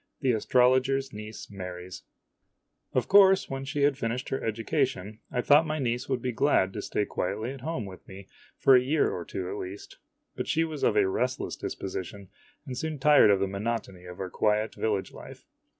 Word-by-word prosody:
THE 130 -3 +3
ASTROLOGER'S 130 +4 +2
NIECE 105 0 -9
MARRIES 90 -2 -8 0.9
OF - - +1
course, 195 -4 +6
when 135 0 -4
she 145 +1 -1
had 145 -1 +2
finished 120 +2 -3
her 135 - -3
education, 110 - -2
I 125 - 0
thought 150 +5 +5
my 155 0 -2
niece 125 -3 -2
would 130 -3 -1
be 125 - -1
glad 115 -7 +2
to - - -4
stay 105 - -1
quietly 110 +7 -3
at 135 -2 -9
home 140 -6 -3
with 95 -1 -11
me 95 0 -11 0.3
for 135 - +6
a 125 - +6
year 145 +4 +1
or 90 - -4
two 90 +2 -5
at 100 +3 -4
least. 95 +1 -8 0.4
But - - -4
she 165 - +2
was 155 -3 -5
of - - +2
a - - +4
restless 125 +7 -2
disposition, 95 0 -6 0.4
and 130 -3 -6
soon 155 +3 -3
tired 145 -4 +6
of 100 -1 +4
the 100 - +1
monotony 100 -2 -4
of 90 0 -10
our 95 -1 -5
quiet 105 +1 +1
village 105 -3 -2
life. - - -12
120 Hz, 195 wpm, -28 LUFS, 100-135 Hz, 0.9 s, course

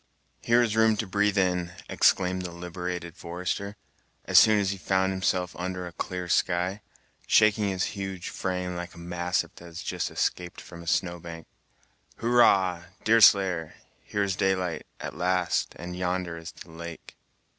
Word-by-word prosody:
"Here 120 +1 +4
is 110 -2 -1
room 110 -1 +4
to 110 - -1
breathe 105 +1 +1
in!" 90 -2 +1
exclaimed 95 0 +2
the 90 - -4
liberated 90 0 -5
forester, 90 +4 -4 0.5
as - - +7
soon 110 -1 +6
as 100 -2 +1
he 100 - -4
found 95 0 +1
himself 95 -2 -1
under 90 0 -3
a 85 - -7
clear 90 0 -4
sky, 90 +4 +1 0.5
shaking 105 -1 +4
his 95 -1 -1
huge 95 -2 -5
frame 90 -1 -3
like 90 0 -6
a - - -14
mastiff 85 +1 -2
that 85 - -12
has 85 +2 -8
just 90 -3 -2
escaped 90 -1 -2
from 85 -1 -11
a 85 - -12
snowbank. 85 -2 -2 0.7
"Hurrah! 95 -7 +3 0.2
Deerslayer; 95 -7 +5 0.3
here 105 - -1
is 95 -1 -1
daylight, 95 -3 -1
at - - -6
last, 90 -1 0
and 90 +1 -6
yonder 90 -1 -2
is 85 -1 -8
the 80 +2 -13
lake." 85 0 -9
90 Hz, 155 wpm, -27 LUFS, 85-95 Hz, 0.7 s, as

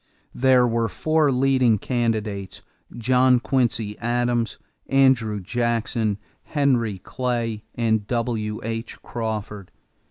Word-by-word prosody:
There 130 -1 +4
were 115 -1 +1
four 155 +2 +1
leading 130 -3 +3
candidates, 110 -5 -2 0.3
John 125 +1 +4
Quincy 115 -3 -1
Adams, 120 0 0 0.3
Andrew 130 -6 +3
Jackson, 115 0 -1 0.2
Henry 125 -8 0
Clay, 115 0 -3
and 110 -3 0
W.H. 115 -1 -3
Crawford. 105 -4 -5
115 Hz, 90 wpm, -23 LUFS, 110-125 Hz, 0.3 s, There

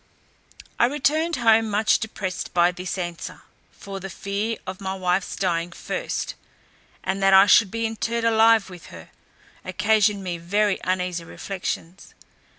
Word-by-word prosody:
I 235 - +5
returned 310 +4 +1
home 225 -2 +3
much 210 +1 +2
depressed 195 -5 -5
by 175 0 +4
this 180 +1 -5
answer; 175 -1 -6 0.3
for 195 -1 -8
the 195 +1 -7
fear 200 +5 -3
of 185 +1 -7
my 190 0 -3
wife's 185 0 -1
dying 175 -2 -1
first, - - -4 0.7
and 190 +1 -2
that 195 0 +5
I 195 +1 +8
should 205 0 +5
be 230 +3 -2
interred 230 +1 -2
alive 225 -1 +5
with 180 -3 -12
her, 80 -1 -12 0.5
occasioned 205 +1 +2
me 175 -2 -4
very 200 +3 +1
uneasy 180 -2 -1
reflections. 180 0 -6
195 Hz, 145 wpm, -23 LUFS, 180-220 Hz, 0.7 s, I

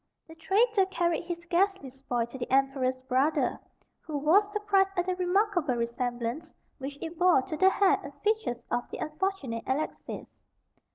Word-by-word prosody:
The 320 - -12
traitor 390 +5 +2
carried 345 -2 0
his 340 0 -5
ghastly 360 -5 +1
spoil 250 -3 -2
to 235 +3 -10
the 245 - -5
Emperor's 265 -1 +1
brother, 265 +4 +1 0.4
who 305 -3 -5
was 375 +9 +3
surprised 395 -2 +1
at 355 - +1
the 370 0 -1
remarkable 360 - +1
resemblance 240 +5 -3 0.3
which 280 +1 -6
it 330 0 -7
bore 355 -7 +5
to 310 - -5
the 375 +4 +5
hair 390 0 +3
and - - -7
features 420 - 0
of 245 - -1
the - - -6
unfortunate 305 - -3
Alexis. 275 +4 -3
320 Hz, 160 wpm, -29 LUFS, 260-380 Hz, 0.4 s, bore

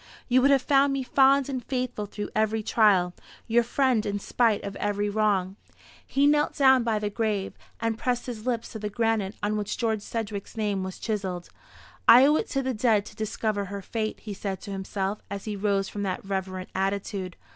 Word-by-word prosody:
You 255 0 +4
would 275 - +5
have 275 -2 +4
found 275 -1 +3
me 275 -1 -1
fond 270 +1 +4
and 260 -3 -4
faithful 250 -5 -3
through 205 +1 -6
every 220 0 +1
trial, 195 -6 +3 0.3
your 235 +1 +3
friend 240 -1 +1
in 205 -1 -2
spite 220 +1 +1
of 200 0 -5
every 205 0 -1
wrong." 200 -3 +1 0.5
He 280 +1 +2
knelt 295 0 +3
down 265 -3 +5
by 225 -2 +1
the 210 0 -2
grave, 210 -3 -1 0.3
and 230 -1 -1
pressed 245 -1 -1
his 235 -2 -6
lips 235 -2 -2
to 220 - -6
the 210 0 -3
granite 220 -1 0
on 210 +1 0
which 210 -1 -3
George 220 -3 0
Sedgewick's 210 -1 -5
name 205 -3 0
was 190 0 -6
chiselled. 190 -5 -3 0.6
"I 245 +3 +9
owe 300 +2 +5
it - - -2
to 275 -1 -1
the 260 0 -1
dead 215 -3 +2
to 215 - -12
discover 215 -1 -2
her 200 0 -6
fate," 215 +2 -3
he 210 - -6
said 195 -1 -4
to 200 - -8
himself, 195 +1 -3
as 200 -1 -6
he 215 -2 -3
rose 200 -1 0
from 205 - -6
that 195 -1 -3
reverent 190 -1 -4
attitude. 195 -1 -2
215 Hz, 200 wpm, -26 LUFS, 200-240 Hz, 0.6 s, I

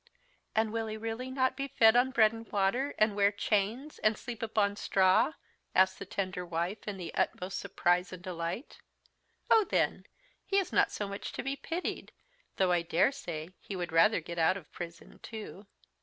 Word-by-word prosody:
"And 220 0 +1
will 225 -1 -1
he 215 0 -4
really 225 +3 -4
not 260 0 +1
be 275 +1 -3
fed 225 -4 +5
on 250 +2 +4
bread 225 -4 +4
and 225 0 -10
water, 210 +8 +1
and 215 -1 +3
wear 200 0 +4
chains, 215 +7 -1
and 215 0 +2
sleep 235 -3 -7
upon 210 -3 +1
straw?" 190 +8 +3 0.4
asked 190 0 +4
the 200 - -7
tender 185 -2 -3
wife 175 +5 -3
in 205 -2 -3
the 175 -3 -6
utmost 185 +1 -1
surprise 180 -2 +1
and 180 -1 -9
delight. 175 - -5 0.7
"Oh, 445 - +7
then, - - 0 0.4
he 390 - 0
is 390 - 0
not - - +4
so 205 - -3
much 200 +1 -6
to - - -4
be 270 +2 -2
pitied, 330 +6 -4 0.4
though 185 -2 +3
I 175 -1 +3
dare 170 +8 +2
say 165 - -6
he 200 - -7
would 175 -2 -3
rather 175 +4 +4
get 170 +1 -6
out 165 +4 +3
of 170 -6 -13
prison 170 -1 -9
too." 215 -2 -9
205 Hz, 185 wpm, -31 LUFS, 180-230 Hz, 0.7 s, Oh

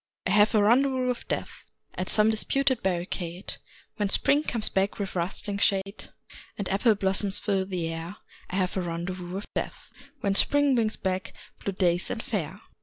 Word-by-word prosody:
I 185 - 0
have 210 +2 +4
a 210 - +4
rendezvous 260 +3 +3
with 250 - -4
Death - - -4 0.3
At 185 - -4
some 215 +1 +4
disputed 260 +3 +1
barricade, 180 0 -3 0.4
When 205 -3 0
Spring 285 +8 +4
comes 235 -7 +4
back 195 +1 0
with 195 -2 -4
rustling 200 +3 -2
shade 195 0 0 0.5
And 200 - -3
apple 210 +3 +3
blossoms 195 0 +2
fill 195 -2 -1
the 180 -4 -2
air 165 +4 -6 0.3
I - - -4
have 185 -2 0
a 190 - 0
rendezvous 175 +1 -5
with 195 +3 -5
Death - - -5 0.3
When 200 - +1
Spring 285 +6 +4
brings 225 -3 +1
back 190 -1 -3 0.3
blue 200 - -2
days 175 -2 +1
and 230 - -4
fair. 190 -2 -4
195 Hz, 175 wpm, -27 LUFS, 185-215 Hz, 0.5 s, have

